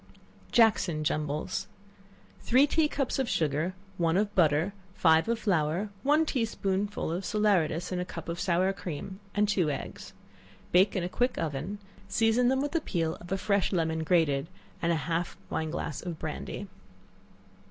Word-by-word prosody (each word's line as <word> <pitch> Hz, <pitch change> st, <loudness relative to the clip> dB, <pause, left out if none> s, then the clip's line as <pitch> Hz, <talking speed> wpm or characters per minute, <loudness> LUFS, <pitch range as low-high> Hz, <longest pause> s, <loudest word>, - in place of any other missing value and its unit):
Jackson 210 Hz, -, +3 dB
Jumbles. 150 Hz, 0 st, -2 dB, 0.7 s
Three 260 Hz, +4 st, +4 dB
tea 310 Hz, +1 st, +2 dB
cups 275 Hz, -3 st, -1 dB
of 265 Hz, -, 0 dB
sugar, 155 Hz, +4 st, 0 dB, 0.2 s
one 165 Hz, 0 st, +2 dB
of 205 Hz, 0 st, 0 dB
butter, 160 Hz, +2 st, +3 dB, 0.2 s
five 160 Hz, +1 st, +4 dB
of 235 Hz, -, +2 dB
flour, 180 Hz, -2 st, 0 dB
one 300 Hz, +3 st, +3 dB
tea 260 Hz, -6 st, 0 dB
spoonful 200 Hz, -4 st, -1 dB
of 175 Hz, +3 st, -2 dB
salaeratus 190 Hz, -7 st, +1 dB
in 180 Hz, -, -1 dB
a -, -, 0 dB
cup 180 Hz, -, -8 dB
of 170 Hz, +1 st, -4 dB
sour 185 Hz, +1 st, +2 dB
cream 190 Hz, +1 st, -6 dB, 0.2 s
and 210 Hz, 0 st, +3 dB
two 190 Hz, -6 st, +2 dB
eggs; 140 Hz, -, -6 dB, 0.6 s
bake 190 Hz, +3 st, +4 dB
in 185 Hz, -, 0 dB
a -, -, -1 dB
quick 245 Hz, +7 st, 0 dB
oven; 160 Hz, +6 st, -3 dB, 0.3 s
season 225 Hz, +4 st, +3 dB
them 265 Hz, +1 st, +2 dB
with 290 Hz, -, -2 dB
the 330 Hz, -, 0 dB
peel 165 Hz, -, -1 dB
of 175 Hz, +2 st, -11 dB
a 195 Hz, -, +1 dB
fresh 200 Hz, -1 st, +1 dB
lemon 160 Hz, -3 st, 0 dB
grated, 160 Hz, -4 st, +2 dB, 0.3 s
and 170 Hz, -, +2 dB
half 165 Hz, +2 st, -1 dB
a 190 Hz, -, -14 dB
wine 160 Hz, 0 st, -1 dB
glass 155 Hz, -2 st, -4 dB
of 175 Hz, -3 st, -5 dB
brandy. 160 Hz, +6 st, -5 dB
180 Hz, 165 wpm, -29 LUFS, 160-210 Hz, 0.7 s, Three